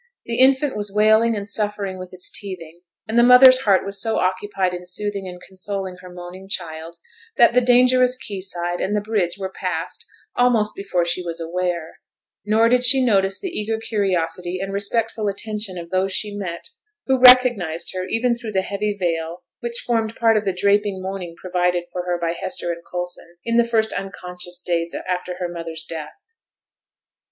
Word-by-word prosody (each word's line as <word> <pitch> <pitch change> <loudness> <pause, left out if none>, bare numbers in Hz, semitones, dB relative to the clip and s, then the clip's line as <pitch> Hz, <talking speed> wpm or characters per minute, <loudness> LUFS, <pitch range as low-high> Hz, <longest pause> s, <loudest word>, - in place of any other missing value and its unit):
The 235 0 -3
infant 265 +2 +4
was 205 -1 -3
wailing 220 +2 +4
and 200 -1 -5
suffering 205 -2 -2
with 185 0 -9
its 185 0 -7
teething, 175 -4 -7 0.3
and 225 +2 +2
the - - +6
mother's 255 +1 +8
heart 200 -7 +2
was 200 0 0
so 225 0 +1
occupied 185 0 -1
in 180 0 -6
soothing 200 +1 -2
and 180 -1 -9
consoling 190 -1 -5
her 180 -1 -12
moaning 180 +2 -10
child, 165 -3 -5 0.4
that 235 -2 +6
the 250 - +4
dangerous 250 +1 +4
quay 210 -5 -6
side 175 -2 -1
and 205 +2 -1
the - - +2
bridge 205 -4 -1
were 190 -1 -5
passed - - -4 0.3
almost 235 -4 +2
before 180 -3 -1
she 170 +1 -1
was 170 -1 -4
aware; 170 0 -3 0.4
nor 215 +3 +3
did 250 +1 +3
she 260 +2 +6
notice 195 -4 +2
the 380 - -4
eager 220 +1 -1
curiosity 180 -5 -2
and 195 +1 -4
respectful 215 +2 -1
attention 210 -1 -1
of 170 -1 -8
those 190 +1 0
she 205 +2 0
met 170 -4 -6 0.4
who 265 -1 +2
recognized 245 -12 +6
her 185 0 -4
even 240 +2 +1
through 235 -2 -6
the 190 -1 +1
heavy 205 +1 -2
veil 165 -1 -2 0.2
which 235 0 -5
formed 225 -2 -1
part 225 -1 +3
of 215 - 0
the 195 - +1
draping 200 +1 +1
mourning 185 -2 -6
provided 180 -1 0
for 180 0 -4
her 175 -1 -1
by 170 -1 -1
Hester 175 0 -4
and 170 0 -6
Coulson, 175 -1 -6
in 230 0 +1
the 235 - +6
first 225 -2 +1
unconscious 180 -2 -5
days 170 -1 -1
after 180 0 -3
her 180 0 -3
mother's 165 -2 -4
death. 160 -2 -7
195 Hz, 180 wpm, -21 LUFS, 180-220 Hz, 0.4 s, mother's